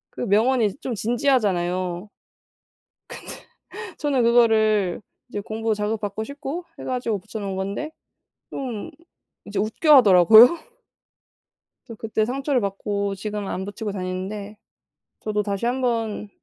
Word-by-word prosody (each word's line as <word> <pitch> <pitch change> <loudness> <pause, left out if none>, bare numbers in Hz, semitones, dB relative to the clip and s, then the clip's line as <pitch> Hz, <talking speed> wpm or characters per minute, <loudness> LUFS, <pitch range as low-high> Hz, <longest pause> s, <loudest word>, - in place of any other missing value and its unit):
그 - - -6
명언이 225 0 +2
좀 265 -3 -5
진지하잖아요. 195 -6 0 1.0
근데 - - -9 0.7
저는 280 -4 +1
그거를 220 -5 +3 0.3
이제 205 -4 -4
공부 220 +1 -2
자극 210 +1 -2
받고 205 +1 -4
싶고 285 +6 -6
해 - - -7
가지고 245 -5 -2
붙여 220 +3 -8
놓은 195 -2 -4
건데 200 +11 -4 0.6
좀 250 0 -5 0.6
이제 205 -1 -4
웃겨하더라고요. 220 - +7 1.3
저 230 - -8
그때 220 0 -1
상처를 265 +2 0
받고 200 0 -2
지금은 205 0 -5
안 190 - -3
붙이고 205 +1 -5
다니는데 195 +3 -5 0.7
저도 210 -1 -1
다시 200 +2 -3
한번 235 -4 -1
215 Hz, 265 characters per minute, -23 LUFS, 200-245 Hz, 1.3 s, 웃겨하더라고요